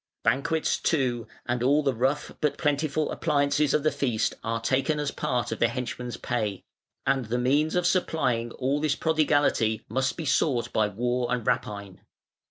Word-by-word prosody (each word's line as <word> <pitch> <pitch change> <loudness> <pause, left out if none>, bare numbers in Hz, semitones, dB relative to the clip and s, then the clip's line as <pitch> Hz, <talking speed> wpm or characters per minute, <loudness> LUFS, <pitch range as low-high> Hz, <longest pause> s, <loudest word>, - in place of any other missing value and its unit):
Banquets, 155 +7 +1
too, 125 -7 0 0.2
and 120 0 -1
all 145 +4 +3
the 135 -2 +1
rough 130 +5 0
but 150 -2 +1
plentiful 150 +1 0
appliances 145 -1 +1
of 150 - +2
the 155 - +3
feast 120 -6 0
are 115 0 -1
taken 135 +6 0
as 145 -1 -1
part 125 -1 -2
of - - -3
the 120 - +4
henchman's 125 +1 -4
pay; 105 -5 -2 0.4
and 135 -2 +1
the 115 +3 -1
means 145 +6 +2
of 180 0 +1
supplying 130 -10 +1
all 135 +3 0
this 155 -2 +1
prodigality 145 -8 +2
must 130 +4 0
be 165 - -4
sought 130 -3 +1
by 110 -1 +3
war 120 +4 -1
and 125 -3 -1
rapine. 100 -3 -2
130 Hz, 170 wpm, -27 LUFS, 120-150 Hz, 0.4 s, the